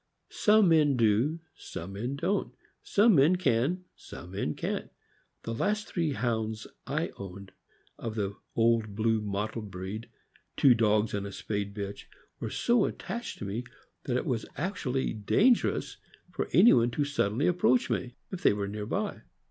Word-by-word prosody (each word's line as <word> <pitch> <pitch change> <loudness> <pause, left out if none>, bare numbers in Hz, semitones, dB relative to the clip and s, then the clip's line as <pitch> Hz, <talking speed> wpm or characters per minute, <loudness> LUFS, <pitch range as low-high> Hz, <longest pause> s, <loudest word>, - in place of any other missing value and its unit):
Some 210 -3 +4
men 150 -5 +4
do, 120 +9 +2
some 90 +4 -8
men 120 +7 -3
don't; 185 +7 -1 0.3
some 215 +2 +4
men 155 +3 +5
can, 175 +2 +1
some 90 - -11
men 95 -6 -2
can't. - - -3 0.5
The 115 - -3
last 210 - 0
three 165 -5 -1
Hounds 110 -2 -2 0.2
I - - -1
owned, 100 0 -9 0.5
of 115 -2 -4
the 100 -2 -2 0.2
old 115 -3 +2
blue 110 0 +1
mottled 105 +1 -3
breed 95 +4 -6 0.2
— - - -34
two 135 - +7
dogs 110 -1 +2
and 100 0 -2
a - - -7
spayed 100 0 -4
bitch 100 -1 -5 0.3
were - - -3
so 235 -3 +2
attached 235 0 -5
to - - -6
me 105 +5 -3 0.4
that 125 -2 0
it - - -2
was 115 -3 -2
actually 145 -7 -1
dangerous 210 - +2 0.3
for - - -3
anyone 120 - +6
to 145 +5 -1
suddenly 140 -2 0
approach 175 -8 +3
me 125 -1 -2 0.2
if 190 - -5
they - - +5
were 100 -1 -2
near 105 +1 -5
by. - - -2
115 Hz, 160 wpm, -29 LUFS, 105-155 Hz, 0.5 s, two